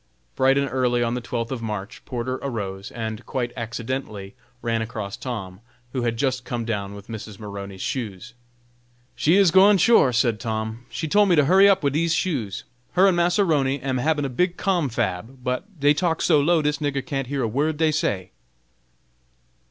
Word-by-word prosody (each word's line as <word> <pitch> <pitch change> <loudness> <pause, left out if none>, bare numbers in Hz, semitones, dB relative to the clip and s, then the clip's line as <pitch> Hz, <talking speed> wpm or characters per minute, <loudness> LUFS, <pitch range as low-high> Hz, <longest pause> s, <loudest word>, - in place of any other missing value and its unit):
Bright 135 +1 +3
and 140 0 +1
early 125 -2 +1
on 115 0 0
the 125 - -2
twelfth 115 0 -4
of 130 -3 -3
March, 105 0 -5
Porter 130 +1 -3
arose, 100 -7 -4
and, 110 0 -5
quite 120 -2 -2
accidentally, 115 -3 -5 0.3
ran 115 -1 0
across 110 -2 -5
Tom, 95 -8 -6 0.3
who 130 - -1
had 115 -1 -1
just 130 -1 0
come 120 -1 -4
down 100 -3 -3
with 100 0 -11
Mrs. 110 -2 -8
Maroney's 100 -2 -7
shoes. 115 -2 -4 0.8
"She 160 +4 +3
is 195 -4 +5
gwine, 195 +3 +6
sure," 205 - +5
said 115 -2 +1
Tom! 110 +1 -4
"she 160 - -4
tole 205 +6 +4
me 180 - +4
to 150 -3 +4
hurry 190 +6 +6
up 195 -4 +3
wid 140 -1 +1
dese 165 +2 +1
shoes. 130 - -2 0.3
Her 185 +1 +5
and 190 -2 +4
Massa 175 +3 +3
'Roney 140 -4 +1
am 130 -1 -2
habin 150 +2 +1
a - - -2
big 180 +8 0
confab, 125 - -1
but 165 +10 -4
dey 145 +1 +5
talk 165 +1 0
so 155 -4 +4
low, 160 +2 +3
dis 150 0 0
nigger 140 -2 -2
can't 135 -5 -3
hear 140 -1 -2
a - - +1
word 145 +7 0
dey 160 0 +3
say." 100 -11 -1
130 Hz, 190 wpm, -23 LUFS, 110-155 Hz, 0.8 s, gwine